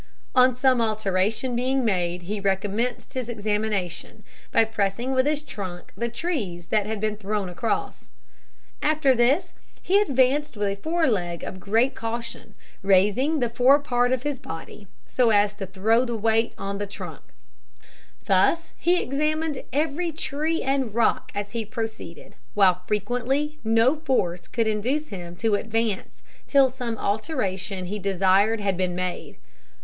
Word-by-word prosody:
On 255 Hz, -1 st, +5 dB
some 255 Hz, -1 st, +3 dB
alteration 215 Hz, +2 st, 0 dB
being 260 Hz, +1 st, +1 dB
made 180 Hz, -4 st, 0 dB
he 205 Hz, +4 st, -3 dB
recommenced 200 Hz, +6 st, -1 dB
his 255 Hz, -3 st, -3 dB
examination, 210 Hz, -5 st, -2 dB, 0.3 s
by 225 Hz, -, +4 dB
pressing 220 Hz, +3 st, -1 dB
with 260 Hz, +1 st, +2 dB
his 300 Hz, 0 st, 0 dB
trunk 185 Hz, -9 st, -7 dB
the 235 Hz, 0 st, -2 dB
trees 225 Hz, -, -3 dB
that 210 Hz, -2 st, +1 dB
had 220 Hz, -1 st, -3 dB
been 215 Hz, 0 st, -1 dB
thrown 205 Hz, -2 st, -2 dB
across. 180 Hz, +6 st, -3 dB, 0.7 s
After 300 Hz, -3 st, +3 dB
this 255 Hz, +8 st, +2 dB, 0.3 s
he 395 Hz, +3 st, +3 dB
advanced 275 Hz, -, +2 dB
a 200 Hz, -1 st, 0 dB
fore 320 Hz, +10 st, 0 dB
leg 175 Hz, -, -1 dB
with 185 Hz, -, -6 dB
great 225 Hz, +7 st, +2 dB
caution, 230 Hz, -2 st, -6 dB, 0.3 s
raising 210 Hz, +11 st, +3 dB
the 240 Hz, -, +2 dB
fore 255 Hz, +4 st, +5 dB
part 245 Hz, -4 st, +1 dB
of 260 Hz, -1 st, 0 dB
his 290 Hz, -3 st, -2 dB
body 165 Hz, +5 st, -9 dB, 0.2 s
so 250 Hz, -2 st, +2 dB
as 205 Hz, -1 st, +3 dB
to 200 Hz, -2 st, -6 dB
throw 215 Hz, +6 st, +2 dB
the 240 Hz, -2 st, -2 dB
weight 225 Hz, +1 st, +1 dB
on 200 Hz, 0 st, -4 dB
the 205 Hz, -, -3 dB
trunk. 180 Hz, -7 st, -8 dB, 1.0 s
Thus 195 Hz, -, +2 dB
he 355 Hz, +2 st, +3 dB
examined 305 Hz, +1 st, -1 dB
every 315 Hz, +5 st, 0 dB
tree 310 Hz, +1 st, -2 dB
and 265 Hz, -5 st, 0 dB
rock 235 Hz, -1 st, +1 dB
as 205 Hz, 0 st, -3 dB
he 230 Hz, -1 st, -2 dB
proceeded, 220 Hz, -6 st, -6 dB, 0.2 s
while 185 Hz, -3 st, +4 dB
frequently 250 Hz, +8 st, -1 dB
no 230 Hz, +6 st, +3 dB
force 180 Hz, -, -1 dB
could 230 Hz, -1 st, 0 dB
induce 245 Hz, +8 st, -1 dB
him 175 Hz, -3 st, -7 dB
to 220 Hz, +4 st, 0 dB
advance 220 Hz, -1 st, -2 dB, 0.2 s
till 275 Hz, -2 st, +5 dB
some 245 Hz, -3 st, -4 dB
alteration 195 Hz, -, -2 dB
he 205 Hz, +4 st, -4 dB
desired 195 Hz, +3 st, +3 dB
had 195 Hz, -2 st, 0 dB
been 180 Hz, -1 st, -1 dB
made. 180 Hz, 0 st, -4 dB
225 Hz, 150 wpm, -25 LUFS, 200-260 Hz, 1.0 s, On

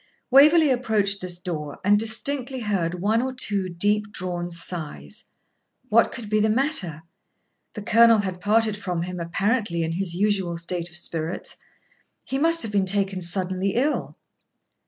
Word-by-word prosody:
Waverley 300 Hz, +3 st, +6 dB
approached 215 Hz, -6 st, 0 dB
this 180 Hz, -1 st, -4 dB
door 150 Hz, -5 st, -5 dB
and 205 Hz, +1 st, +4 dB
distinctly 255 Hz, +4 st, -1 dB
heard 185 Hz, -6 st, -1 dB
one 220 Hz, +3 st, +2 dB
or 260 Hz, +1 st, -2 dB
two 200 Hz, -6 st, -1 dB
deep 205 Hz, +4 st, -1 dB
drawn 175 Hz, -3 st, -4 dB
sighs. 160 Hz, -, -5 dB, 0.6 s
What 230 Hz, +2 st, +3 dB
could 235 Hz, -4 st, -8 dB
be 215 Hz, +1 st, +1 dB
the 215 Hz, +1 st, +2 dB
matter? 215 Hz, -, 0 dB, 0.7 s
The 210 Hz, -, -6 dB
Colonel 230 Hz, +1 st, +5 dB
had 190 Hz, -3 st, -3 dB
parted 215 Hz, +1 st, +2 dB
from 180 Hz, -4 st, -4 dB
him 180 Hz, 0 st, -6 dB
apparently 185 Hz, +1 st, -1 dB
in 160 Hz, -, -2 dB
his 175 Hz, 0 st, -2 dB
usual 190 Hz, -3 st, 0 dB
state 170 Hz, 0 st, -4 dB
of 175 Hz, -, -1 dB
spirits. 165 Hz, 0 st, +1 dB, 0.7 s
He 270 Hz, -, -3 dB
must 330 Hz, +2 st, +4 dB
have 220 Hz, -, -1 dB
been 195 Hz, -2 st, +1 dB
taken 195 Hz, -1 st, 0 dB
suddenly 185 Hz, +2 st, -1 dB
ill. 280 Hz, +5 st, -1 dB
200 Hz, 155 wpm, -23 LUFS, 175-225 Hz, 0.7 s, Waverley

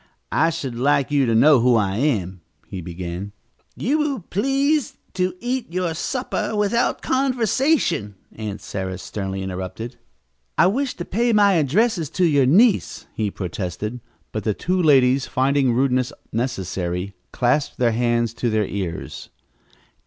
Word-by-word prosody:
"I 165 Hz, -, +3 dB
should 145 Hz, -6 st, -4 dB
like 140 Hz, +3 st, +1 dB
you 140 Hz, -3 st, +3 dB
to 115 Hz, -, +2 dB
know 140 Hz, +3 st, +6 dB
who 120 Hz, +1 st, +4 dB
I 100 Hz, -3 st, +1 dB
am," 100 Hz, -, -1 dB, 0.2 s
he 95 Hz, -, -7 dB
began. 90 Hz, +3 st, -6 dB, 0.4 s
"You 290 Hz, +6 st, 0 dB
will 285 Hz, -6 st, -1 dB
please 275 Hz, -, +1 dB, 0.2 s
to 185 Hz, -1 st, -1 dB
eat 245 Hz, -3 st, -3 dB
your 180 Hz, -2 st, -1 dB
supper 245 Hz, +6 st, -2 dB
without 210 Hz, +3 st, +1 dB
conversation," 255 Hz, -, +1 dB, 0.2 s
Aunt 105 Hz, -2 st, -5 dB
Sarah 95 Hz, -2 st, -4 dB
sternly 95 Hz, 0 st, -5 dB
interrupted. 95 Hz, +6 st, -6 dB, 0.6 s
"I -, -, +6 dB
wish 255 Hz, +8 st, 0 dB
to 175 Hz, -, -6 dB
pay 235 Hz, +4 st, +1 dB
my 205 Hz, -2 st, +5 dB
addresses 170 Hz, -, +1 dB
to 185 Hz, -, +4 dB
your 145 Hz, -5 st, +3 dB
niece," 205 Hz, -, +3 dB
he 110 Hz, -2 st, -1 dB
protested, 100 Hz, +5 st, -4 dB, 0.3 s
but 110 Hz, -, -4 dB
the 105 Hz, -1 st, 0 dB
two 185 Hz, +1 st, 0 dB
ladies, 135 Hz, -4 st, +4 dB
finding 135 Hz, 0 st, +2 dB
rudeness 125 Hz, 0 st, +1 dB, 0.2 s
necessary, 95 Hz, -5 st, -2 dB, 0.2 s
clasped 135 Hz, +4 st, 0 dB
their 120 Hz, -2 st, +2 dB
hands 120 Hz, 0 st, +1 dB
to 120 Hz, +1 st, -1 dB
their 110 Hz, -1 st, +1 dB
ears. 95 Hz, -4 st, -5 dB
130 Hz, 145 wpm, -22 LUFS, -, 0.6 s, know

